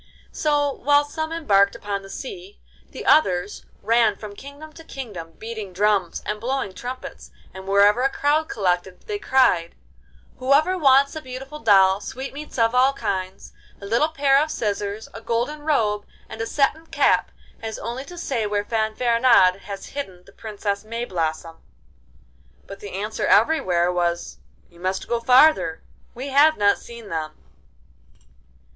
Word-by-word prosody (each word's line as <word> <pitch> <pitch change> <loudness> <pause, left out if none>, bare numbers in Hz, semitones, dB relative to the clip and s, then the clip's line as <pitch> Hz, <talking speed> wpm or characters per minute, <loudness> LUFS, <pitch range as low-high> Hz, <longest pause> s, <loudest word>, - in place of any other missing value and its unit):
So 290 -2 +1
while 290 +2 +2
some 315 +2 -4
embarked 200 -12 +2
upon 200 -1 -4
the 195 - -13
sea, 395 - -8 0.3
the - - -9
others 190 -10 +2 0.2
ran 225 -1 +3
from 210 0 -9
kingdom 285 +5 -11
to 325 - -13
kingdom 205 - -8
beating 220 -4 -7
drums 200 -2 0
and 210 0 -4
blowing 255 -5 -2
trumpets, 250 +7 -8 0.2
and 190 0 -10
wherever 200 +4 +4
a 270 - +3
crowd 300 +3 0
collected 180 -2 -1
they 415 -1 -5
cried: 255 - +2 0.6
'Whoever 280 +8 +3
wants 280 -4 +4
a 315 - -5
beautiful 265 +3 -8
doll, 195 -4 +5
sweetmeats 275 +6 -7
of 230 0 +2
all 260 +2 +4
kinds, 190 -7 -4 0.3
a 200 - -10
little 235 +10 +2
pair 280 -3 +3
of 310 - -1
scissors, 205 -3 -3
a 225 - -9
golden 240 +7 -2
robe, 215 -9 0 0.2
and 220 0 -7
a 225 - -2
satin 300 +5 0
cap - - +2 0.3
has 225 -1 -5
only 245 +3 -5
to 350 - -11
say 250 -10 -2
where 205 0 -1
Fanfaronade 230 -3 +3
has 200 0 -8
hidden 190 -11 -6
the 195 - -17
Princess 205 -2 -4
Mayblossom.' 170 -8 -4 1.0
But 195 0 -10
the 200 -1 -9
answer 210 +3 -3
everywhere 185 - +3
was, 170 - -2 0.3
'You 170 - -21
must 185 +1 -3
go 235 - 0
farther, 250 - +4 0.3
we 260 +4 -6
have 295 +3 +5
not 205 0 +3
seen 235 -3 -11
them. 155 -2 -4
225 Hz, 150 wpm, -22 LUFS, 195-275 Hz, 1.0 s, doll